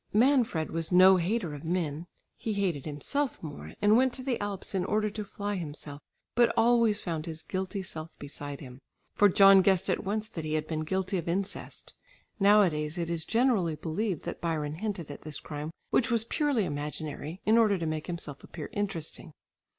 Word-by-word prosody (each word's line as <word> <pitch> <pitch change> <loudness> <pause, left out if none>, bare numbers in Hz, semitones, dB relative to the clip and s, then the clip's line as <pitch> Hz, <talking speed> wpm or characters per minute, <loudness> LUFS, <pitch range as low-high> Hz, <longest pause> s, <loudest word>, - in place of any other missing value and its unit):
Manfred 230 - +3
was 165 +1 -2
no 185 +1 +8
hater 180 -2 -1
of 145 - -8
men; 165 -1 -2 0.3
he 220 - -3
hated 185 -9 -1
himself 245 - -2
more, 145 -3 -7
and 210 +1 +6
went 260 +1 +4
to 260 - -5
the 255 -4 -1
Alps 205 -2 -4
in 190 -2 +1
order 215 +1 +1
to 210 +1 -4
fly 205 0 -4
himself, 150 -3 -7 0.3
but 240 0 +4
always 230 -2 +4
found 165 -3 -3
his 160 -1 -6
guilty 190 +1 -3
self 160 -3 -6
beside 145 0 -7
him, 130 -2 -10 0.3
for 205 - +5
John 195 0 +8
guessed 190 0 +3
at - - -1
once 215 +2 -2
that 165 -7 -6
he 155 0 -1
had 155 -1 -1
been 155 -1 -3
guilty 190 +2 -1
of 170 - -7
incest. 190 +3 -3 0.5
Nowadays 180 -6 +4
it 170 -1 -2
is 165 -1 -2
generally 225 -9 +2
believed 170 +4 -2
that 175 - -5
Byron 155 -3 -1
hinted 190 -6 -4
at 145 - -9
this 155 -2 -6
crime, 150 0 -6 0.2
which 235 - +3
was 230 -2 +2
purely 280 - +1
imaginary, 150 +2 -5
in 220 - +5
order 210 -3 +4
to 170 - -3
make 155 -1 -3
himself 165 -5 -6
appear 155 -4 -8
interesting. 175 -4 -4
180 Hz, 190 wpm, -29 LUFS, 155-210 Hz, 0.5 s, no